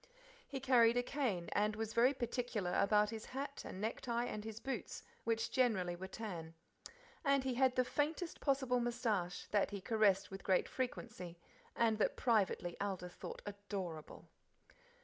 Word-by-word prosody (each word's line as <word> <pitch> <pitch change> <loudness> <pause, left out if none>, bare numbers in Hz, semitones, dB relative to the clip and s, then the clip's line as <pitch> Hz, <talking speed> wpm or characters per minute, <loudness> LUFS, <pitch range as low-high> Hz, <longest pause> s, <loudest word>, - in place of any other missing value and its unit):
He 270 - -4
carried 245 -3 +5
a 245 - +3
cane, 245 -11 -1
and 210 +1 +2
was 225 0 -3
very 250 +4 +5
particular 235 -7 -1
about 210 +1 +4
his 225 -1 -5
hat 280 +2 -5
and 185 - -7
necktie 235 +3 -1
and 215 -3 -4
his 220 0 -6
boots, 270 +2 -4 0.2
which 225 0 0
generally 195 -9 +2
were 185 +2 -6
tan. 175 -6 -6 0.7
And 275 -2 +3
he 260 -1 0
had 255 0 +3
the 255 - +3
faintest 310 +6 -1
possible 265 -3 +2
moustache, 230 -7 -1
that 205 -1 +3
he 200 0 -4
caressed 200 -2 +3
with 195 - -7
great 190 -1 +3
frequency; 220 -9 -4 0.4
and 225 -2 +3
that - - +2
privately 200 -7 +2
Aldith 185 -3 -3
thought - - -7
adorable. 200 -6 -6
225 Hz, 155 wpm, -37 LUFS, 195-250 Hz, 0.7 s, carried